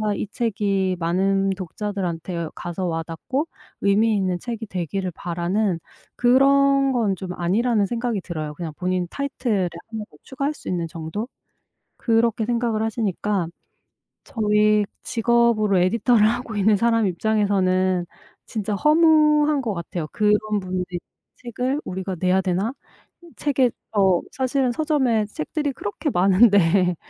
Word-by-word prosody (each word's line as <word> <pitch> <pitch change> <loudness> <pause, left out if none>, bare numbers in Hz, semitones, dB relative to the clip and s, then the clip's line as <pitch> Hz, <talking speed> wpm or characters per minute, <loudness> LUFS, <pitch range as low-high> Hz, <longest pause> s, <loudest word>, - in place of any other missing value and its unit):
이 205 - -3
책이 195 -4 -1
많은 195 +3 +1
독자들한테 180 -3 -4
가서 175 +2 -4
와 165 -1 -1
닿고 260 - -3 0.3
의미 210 +3 +3
있는 185 -3 0
책이 230 0 -5
되기를 185 0 -3
바라는 175 +2 -1 0.4
그런 275 +2 +4
건 225 -6 +1
좀 185 -1 -6
아니라는 205 +4 +1
생각이 235 -3 -2
들어요 155 -4 -5
그냥 160 +1 -6
본인 180 -1 -1
타이틀에 250 -9 -1 0.2
1 220 -1 -5
더 150 - -18
추가할 275 +3 -3
수 - - -9
있는 170 -2 -1
정도? 165 +8 -5 0.7
그렇게 225 -1 +1
생각을 235 -2 0
하시니까 205 -4 -1 0.8
저희 210 -1 +2 0.2
직업으로 230 -4 +2
에디터를 215 +4 +3
하고 235 0 -2
있는 210 +1 +3
사람 230 +1 +2
입장에서는 185 -2 +1 0.4
진짜 210 -2 -3
허무한 300 - +4
것 225 -4 -2
같아요. 170 -2 -5
'그런 210 0 +2
분들의 185 0 -3 0.5
책을 255 +4 -3
우리가 190 +1 -4
내야 185 +1 +2
되나?' 190 +6 -1 0.6
책에 265 -4 +2 0.3
어 190 -3 +4
사실은 260 -1 0
서점에 265 -7 +1
책들이 285 - -3
그렇게 250 +8 -3
많은데 185 -2 +4
210 Hz, 290 characters per minute, -23 LUFS, 185-235 Hz, 0.8 s, 그런